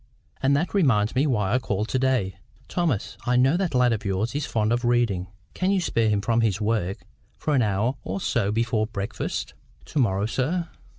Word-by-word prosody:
And 140 +1 +3
that 170 +5 -2
reminds 115 - +3
me 140 +4 +2
why 105 -6 +1
I 125 - +3
called 105 -2 -2
to 130 - 0
day. 125 -8 +1 0.3
Thomas, 165 - -1
I 125 - +3
know 130 +5 +4
that 180 -5 -1
lad 125 -1 +4
of 110 - -3
yours 100 +4 -1
is 145 0 -2
fond 110 0 +1
of 120 +1 0
reading. 120 -7 +1 0.3
Can 185 - 0
you 200 -1 +3
spare 115 -10 +1
him 105 -1 +1
from 115 +3 +1
his 105 -3 +1
work 105 -4 -1 0.3
for 150 - -1
an 135 - +4
hour 110 +5 0
or 95 +1 -3
so 105 -1 0
before 110 0 0
breakfast?" 100 -2 -4 0.3
"To 150 - -2
morrow, 100 -5 +2
sir?" 160 +9 -1
115 Hz, 200 wpm, -25 LUFS, 105-130 Hz, 0.3 s, know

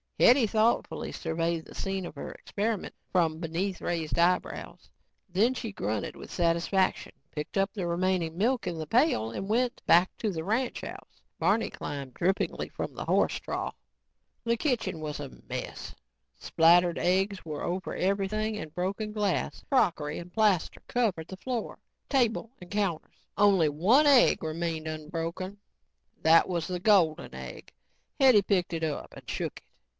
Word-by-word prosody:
Hetty 245 0 +6
thoughtfully 220 +2 +1
surveyed 165 0 -2
the - - -13
scene 195 -1 -2
of - - -7
her 145 - -7
experiment 210 0 -3 0.2
from 165 -3 +2
beneath 175 +3 -2
raised 165 -2 -2
eyebrows. 180 +1 0 0.4
Then 215 +8 +2
she 230 -4 -4
grunted 105 - -3
with - - -10
satisfaction, 175 +2 +1 0.2
picked 150 +5 -5
up 195 +1 +1
the 190 -5 -3
remaining 170 -1 0
milk 230 +1 +1
in 175 -2 -2
the 160 - -4
pail 230 - +2
and 195 - -5
went 245 +3 +1
back 175 +3 +5
to 215 - -1
the 160 -3 -4
ranch 230 +7 -1
house. - - -10 0.2
Barney 225 - +2
climbed 140 -3 -6
drippingly 185 +7 -1
from - - -5
the - - -6
horse - - +2
trough. - - -4 0.7
The 235 0 +1
kitchen 245 - -1
was 150 -1 -4
a 145 -2 -5 0.2
mess. - - -5 0.4
Splattered 170 +1 +4
eggs 190 +2 +1
were 150 -3 -5
over 185 +2 -3
everything 205 +3 0
and 155 -7 -7
broken 200 +5 -2
glass, 205 -3 -1
crockery 165 - +1
and 175 +1 -10
plaster 210 -6 +2
covered 200 -10 0
the 190 - -7
floor, 245 +2 -4 0.3
table 235 -4 +1
and 180 - -12
counters. 195 -6 -3
Only 195 -6 +5
one 200 - +4
egg 275 - +5
remained 160 0 -3
unbroken. 165 +5 -4 0.6
That 165 +1 +6
was 170 -3 -2
the 180 -1 -3
golden 180 -6 +3
egg. - - -9 0.5
Hetty 260 -6 +7
picked 185 -3 +1
it 165 -1 -2
up 155 -2 -3
and - - -13
shook - - -3
it. - - -34
185 Hz, 155 wpm, -29 LUFS, 165-215 Hz, 0.7 s, Hetty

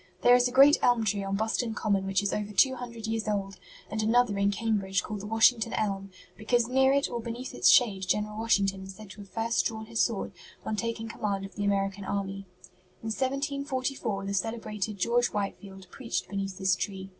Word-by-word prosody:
There 245 - +7
is 245 0 +5
a - - -5
great 275 +3 +7
elm 240 -2 +3
tree 205 -1 0
on 195 0 -2
Boston 220 +2 -1
Common 195 -2 0
which 195 0 +1
is 200 - -1
over 210 0 -3
two 260 +6 +5
hundred 235 -3 -7
years 225 -1 -2
old, 195 -2 -2 0.3
and 220 - -3
another 225 0 +3
in 200 0 +3
Cambridge 200 -3 0
called 210 -1 -5
the 205 - -7
'Washington 225 +1 +3
Elm,' 195 -2 -2 0.3
because 230 +2 +1
near 265 +1 +3
it 280 0 +2
or 235 - -4
beneath 235 +3 -6
its - - +4
shade 200 -8 +4
General 210 +2 -1
Washington 200 -4 +1
is 190 0 -9
said 210 -1 -12
to 205 - -11
have 200 - -13
first 225 +4 0
drawn 220 -1 -3
his 225 0 -4
sword 225 -4 -1 0.3
on 215 - -2
taking 230 +1 -3
command 200 -3 -3
of 195 - -11
the 205 - -4
American 195 0 0
army. 195 0 -4 0.6
In 225 - -3
1744 265 -4 -2
the 200 - -3
celebrated 215 0 -3
George 240 +5 +2
Whitefield 195 -2 -5
preached 245 -4 -4
beneath 195 -1 -4
this 190 -1 +2
tree." 190 0 -5
215 Hz, 200 wpm, -28 LUFS, 195-235 Hz, 0.6 s, There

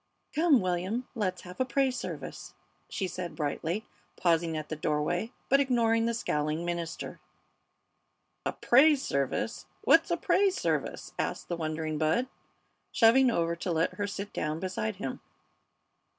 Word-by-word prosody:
"Come, 315 -5 +4
William, 185 +7 -1
let's 195 -6 -2
have 180 0 -10
a - - +4
praise 260 0 +1
service," - - -6 0.3
she 195 - -2
said, 175 -2 -5
brightly, 160 +7 -2 0.3
pausing 165 -2 +1
at 155 -1 -5
the 155 - -4
doorway, 155 +8 -1 0.2
but 275 - +5
ignoring 230 -4 +2
the 235 - 0
scowling 155 -5 -1
minister. 170 -1 -4 1.2
"A - - 0
praise 275 +3 +5
service! 140 - -1 0.2
What's - - +5
a - - +1
praise 390 -1 +3
service?" - - -2
asked - - -2
the 175 - 0
wondering 155 -1 -3
Bud, 160 +11 +2 0.7
shoving 250 +3 +6
over 170 -6 +1
to 175 - -3
let 165 0 +1
her 205 -1 -2
sit 200 0 -5
down 155 +1 -2
beside 110 -13 -2
him. - - -5
180 Hz, 145 wpm, -29 LUFS, 160-235 Hz, 1.2 s, shoving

